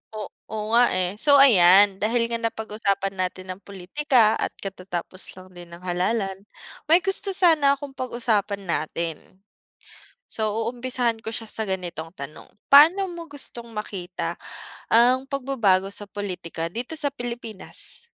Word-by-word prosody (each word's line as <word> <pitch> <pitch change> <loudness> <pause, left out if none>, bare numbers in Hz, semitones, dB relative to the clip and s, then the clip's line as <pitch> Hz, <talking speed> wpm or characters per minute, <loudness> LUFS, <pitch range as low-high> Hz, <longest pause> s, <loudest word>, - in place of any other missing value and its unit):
O 215 - -5 0.3
oo, 215 0 -5
nga, 240 +1 +6
eh. 180 -1 0
So 285 +3 +6
ayan, 195 -6 +7
dahil 230 +2 0
nga 230 - -1
napag-usapan 210 -3 -2
natin 185 0 -3
ang 185 - -8
pulitika 215 +4 +1
at - - -3
katatapos 185 -1 -7
lang 185 0 -13
din 175 -1 -11
ng 170 +1 -12
halalan, 190 +2 -1 0.5
may 340 +3 +5
gusto 390 0 -1
sana 310 -7 +4
akong 280 0 -9
pag-usapan 230 -6 -2
natin. 170 +2 -4 0.9
So, 220 -1 -1 0.2
uumpisahan 245 -2 -1
ko 220 - -4
siya 225 0 -5
sa 220 - -3
ganitong 180 -5 -4
tanong. 140 +2 -9 0.2
Paano 330 +8 +7
mo 340 -2 -8
gustong 240 -5 -5
makita 195 -4 -5 0.6
ang 250 +3 +4
pagbabago 230 -9 +1
sa 205 0 -7
pulitika 180 -5 -5
dito 250 - -5
sa 285 -2 0
Pilipinas? 240 - -4
220 Hz, 140 wpm, -24 LUFS, 185-255 Hz, 0.9 s, ayan